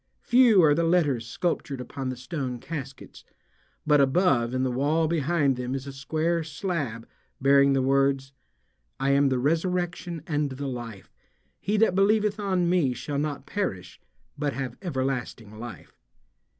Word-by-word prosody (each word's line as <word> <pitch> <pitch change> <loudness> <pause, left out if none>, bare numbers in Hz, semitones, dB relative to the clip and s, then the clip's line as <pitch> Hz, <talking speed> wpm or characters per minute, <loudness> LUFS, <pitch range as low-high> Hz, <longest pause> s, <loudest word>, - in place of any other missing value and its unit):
Few 240 -4 +5
are 150 -2 +6
the 165 +3 +1
letters 150 -9 +1
sculptured 165 -5 -2
upon 130 +1 -5
the 130 - -3
stone 130 -1 -4
caskets, 135 -1 -8 0.6
but 150 -2 +5
above 135 -4 +2
in 130 0 -1
the 130 - 0
wall 150 +6 +1
behind 150 -4 +1
them 125 +1 -3
is 135 0 -5
a 140 - -7
square 160 +5 -1
slab 150 - -4 0.3
bearing 140 0 +5
the 135 -1 +1
words: 135 0 +1 0.7
"I 135 +1 +1
am 140 0 +4
the 130 - +1
resurrection 170 +3 -1
and 150 -4 -1
the 135 +2 -6
life; 120 -6 -7 0.5
he 210 +2 -1
that 220 -3 +4
believeth 210 +2 +2
on 185 -4 0
me 170 -8 +2
shall 140 +4 -3
not 145 -2 -3
perish 190 - -4 0.4
but 145 -2 -1
have 130 -3 -4
everlasting 130 - -3
life." 120 -1 -9
140 Hz, 150 wpm, -26 LUFS, 130-170 Hz, 0.7 s, are